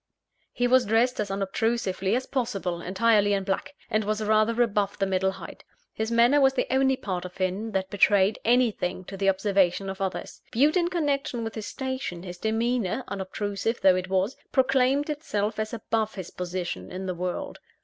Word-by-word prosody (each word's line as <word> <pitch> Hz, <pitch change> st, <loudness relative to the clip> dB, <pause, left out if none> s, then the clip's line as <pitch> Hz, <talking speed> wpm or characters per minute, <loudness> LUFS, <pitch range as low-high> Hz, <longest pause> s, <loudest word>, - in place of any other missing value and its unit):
He 245 Hz, -, 0 dB
was 255 Hz, -2 st, +4 dB
dressed 235 Hz, +4 st, +2 dB
as 210 Hz, -2 st, -1 dB
unobtrusively 195 Hz, 0 st, 0 dB
as 255 Hz, -, -1 dB
possible, 195 Hz, -10 st, -2 dB
entirely 205 Hz, +2 st, +3 dB
in 195 Hz, -1 st, 0 dB
black; 200 Hz, +9 st, -3 dB
and 215 Hz, 0 st, 0 dB
was 215 Hz, +1 st, -1 dB
rather 215 Hz, +2 st, +2 dB
above 205 Hz, -3 st, -1 dB
the 195 Hz, -, +1 dB
middle 190 Hz, 0 st, +1 dB
height. 190 Hz, -3 st, -10 dB, 0.3 s
His 220 Hz, 0 st, -2 dB
manner 240 Hz, +5 st, +4 dB
was 270 Hz, 0 st, +5 dB
the -, -, +1 dB
only 265 Hz, 0 st, +3 dB
part 185 Hz, -6 st, -4 dB
of 180 Hz, +1 st, -9 dB
him 190 Hz, +4 st, -2 dB
that 190 Hz, -1 st, -1 dB
betrayed 205 Hz, 0 st, +4 dB
anything 220 Hz, -7 st, +1 dB
to 195 Hz, -, -8 dB
the 195 Hz, 0 st, +2 dB
observation 195 Hz, -1 st, +1 dB
of 190 Hz, -, -9 dB
others. 190 Hz, -1 st, -4 dB
Viewed 290 Hz, +8 st, +3 dB
in 345 Hz, -2 st, +3 dB
connection 290 Hz, -8 st, -1 dB
with 225 Hz, -1 st, -4 dB
his 215 Hz, -2 st, -6 dB
station, 260 Hz, -10 st, -4 dB
his 180 Hz, -1 st, -8 dB
demeanour 225 Hz, +1 st, 0 dB
(unobtrusive 200 Hz, +3 st, -3 dB
though 190 Hz, -1 st, +6 dB
it 185 Hz, 0 st, -3 dB
was) 190 Hz, +6 st, +1 dB, 0.2 s
proclaimed 265 Hz, +2 st, +3 dB
itself 220 Hz, -9 st, -2 dB
as 215 Hz, 0 st, -2 dB
above 225 Hz, -1 st, -2 dB
his 185 Hz, -3 st, -7 dB
position 180 Hz, -1 st, -4 dB
in 185 Hz, +1 st, -5 dB
the 185 Hz, -, -2 dB
world. 180 Hz, +1 st, -4 dB
210 Hz, 180 wpm, -26 LUFS, 190-240 Hz, 0.3 s, though